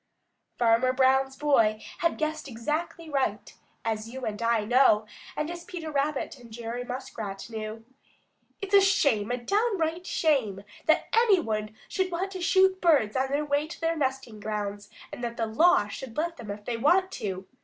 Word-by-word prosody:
Farmer 240 Hz, +2 st, +3 dB
Brown's 265 Hz, +1 st, +3 dB
boy 230 Hz, -8 st, +3 dB, 0.2 s
had 335 Hz, -1 st, +1 dB
guessed 310 Hz, -1 st, -2 dB
exactly 305 Hz, +7 st, -3 dB
right, 265 Hz, -8 st, -1 dB, 0.3 s
as 220 Hz, 0 st, -2 dB
you 260 Hz, +1 st, -6 dB
and 210 Hz, +1 st, -4 dB
I 230 Hz, -2 st, +2 dB
know, 235 Hz, -2 st, +4 dB, 0.3 s
and 300 Hz, +2 st, -1 dB
as 345 Hz, 0 st, -7 dB
Peter 335 Hz, -3 st, -6 dB
Rabbit 280 Hz, -1 st, -1 dB
and 235 Hz, -2 st, -14 dB
Jerry 235 Hz, +2 st, -5 dB
Muskrat 225 Hz, -5 st, -6 dB
knew. 220 Hz, 0 st, -6 dB, 0.8 s
"It's 395 Hz, 0 st, -5 dB
a 400 Hz, -, +8 dB
shame, 280 Hz, -, +3 dB
a 245 Hz, -, 0 dB
downright 360 Hz, -, 0 dB
shame 240 Hz, -, +1 dB, 0.2 s
that 315 Hz, -, +4 dB
any 450 Hz, -4 st, +5 dB
one 215 Hz, -6 st, -3 dB
should 375 Hz, -1 st, -1 dB
want 375 Hz, +3 st, -2 dB
to 375 Hz, -2 st, -6 dB
shoot 375 Hz, +2 st, +3 dB
birds 290 Hz, -12 st, +3 dB
on 265 Hz, +1 st, +1 dB
their 290 Hz, +2 st, 0 dB
way 290 Hz, +1 st, 0 dB
to 330 Hz, -, -9 dB
their 330 Hz, 0 st, 0 dB
nesting 265 Hz, -6 st, -2 dB
grounds 205 Hz, -1 st, -4 dB, 0.2 s
and 245 Hz, -, -7 dB
that 235 Hz, 0 st, -3 dB
the 225 Hz, -, 0 dB
law 225 Hz, 0 st, +4 dB
should 230 Hz, +4 st, -8 dB
let 335 Hz, +2 st, -1 dB
them 230 Hz, -3 st, -9 dB
if 205 Hz, +1 st, -6 dB
they 240 Hz, -2 st, -2 dB
do -, -, -9 dB
want 370 Hz, +7 st, +4 dB
to. 190 Hz, -2 st, -5 dB
265 Hz, 180 wpm, -27 LUFS, 220-330 Hz, 0.8 s, a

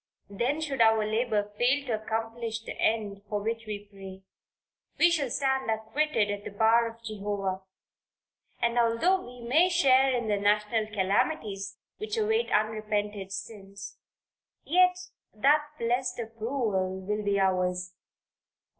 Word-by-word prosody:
Then 250 Hz, +10 st, -1 dB
should 275 Hz, -5 st, -1 dB
our 220 Hz, -1 st, +5 dB
labor 215 Hz, -2 st, 0 dB
fail 260 Hz, +4 st, +2 dB
to 220 Hz, -4 st, -2 dB
accomplish 225 Hz, 0 st, -3 dB
the -, -, -7 dB
end 210 Hz, -3 st, 0 dB
for 210 Hz, -, -1 dB
which 225 Hz, +2 st, -3 dB
we 205 Hz, -1 st, -5 dB
pray; 195 Hz, -1 st, -11 dB, 0.7 s
we 345 Hz, -, +5 dB
shall 295 Hz, -6 st, 0 dB
stand 265 Hz, 0 st, 0 dB
acquitted 220 Hz, 0 st, 0 dB
at 205 Hz, 0 st, -5 dB
the -, -, -6 dB
bar 225 Hz, +3 st, +3 dB
of 230 Hz, 0 st, -11 dB
Jehovah, 200 Hz, -3 st, -3 dB, 1.0 s
and 235 Hz, 0 st, +1 dB
although 240 Hz, +12 st, +3 dB
we 245 Hz, -4 st, -11 dB
may 320 Hz, +9 st, +4 dB
share 270 Hz, -6 st, +4 dB
in 240 Hz, -3 st, -1 dB
the 205 Hz, -1 st, +1 dB
national 210 Hz, +2 st, +1 dB
calamities 200 Hz, 0 st, -1 dB, 0.2 s
which 430 Hz, +2 st, -4 dB
await 445 Hz, +2 st, +1 dB
unrepented 210 Hz, -2 st, -1 dB
sins, 200 Hz, -1 st, -8 dB, 0.6 s
yet 360 Hz, +3 st, +4 dB, 0.4 s
that 295 Hz, +7 st, +3 dB
blessed 245 Hz, +1 st, -1 dB
approval 225 Hz, -5 st, -2 dB
will 210 Hz, +2 st, -2 dB
be 200 Hz, -1 st, +1 dB
ours. 180 Hz, -1 st, 0 dB
220 Hz, 135 wpm, -28 LUFS, 205-255 Hz, 1.0 s, our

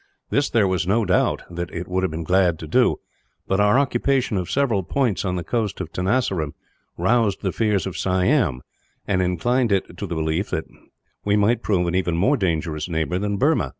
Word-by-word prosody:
This 140 Hz, -1 st, +2 dB
there 110 Hz, -4 st, +3 dB
was 95 Hz, -1 st, -1 dB
no 110 Hz, +3 st, +2 dB
doubt 90 Hz, -1 st, +1 dB
that 85 Hz, 0 st, -4 dB
it 85 Hz, +1 st, -5 dB
would 95 Hz, +1 st, -1 dB
have 95 Hz, -, 0 dB
been 80 Hz, +1 st, -5 dB
glad 90 Hz, 0 st, +2 dB
to 80 Hz, -, -8 dB
do, -, -, +3 dB, 0.5 s
but 95 Hz, -, +1 dB
our 105 Hz, +4 st, +4 dB
occupation 135 Hz, -3 st, +1 dB
of 90 Hz, -2 st, -2 dB
several 130 Hz, -8 st, +1 dB
points 120 Hz, +2 st, 0 dB
on 90 Hz, -2 st, -1 dB
the 90 Hz, -, -3 dB
coast 110 Hz, +1 st, -2 dB
of 85 Hz, -3 st, -6 dB
Tenasserim 90 Hz, -, 0 dB, 0.4 s
roused 105 Hz, +2 st, +1 dB
the 95 Hz, -, 0 dB
fears 105 Hz, -2 st, 0 dB
of 95 Hz, -2 st, -5 dB
Siam, 95 Hz, -, +1 dB, 0.4 s
and 95 Hz, -1 st, +1 dB
inclined 110 Hz, +7 st, +1 dB
it 95 Hz, -1 st, 0 dB
to -, -, -3 dB
the 85 Hz, -, -4 dB
belief 80 Hz, +4 st, -1 dB
that -, -, -2 dB, 0.6 s
we 100 Hz, 0 st, +2 dB
might 105 Hz, +4 st, +2 dB
prove 90 Hz, -4 st, +1 dB
an 85 Hz, -, -1 dB
even 90 Hz, -2 st, 0 dB
more 130 Hz, +12 st, +3 dB
dangerous 80 Hz, -, -2 dB
neighbour 80 Hz, +2 st, -1 dB
than 100 Hz, 0 st, -1 dB
Burma. 150 Hz, +8 st, +2 dB
95 Hz, 200 wpm, -22 LUFS, 85-110 Hz, 0.6 s, our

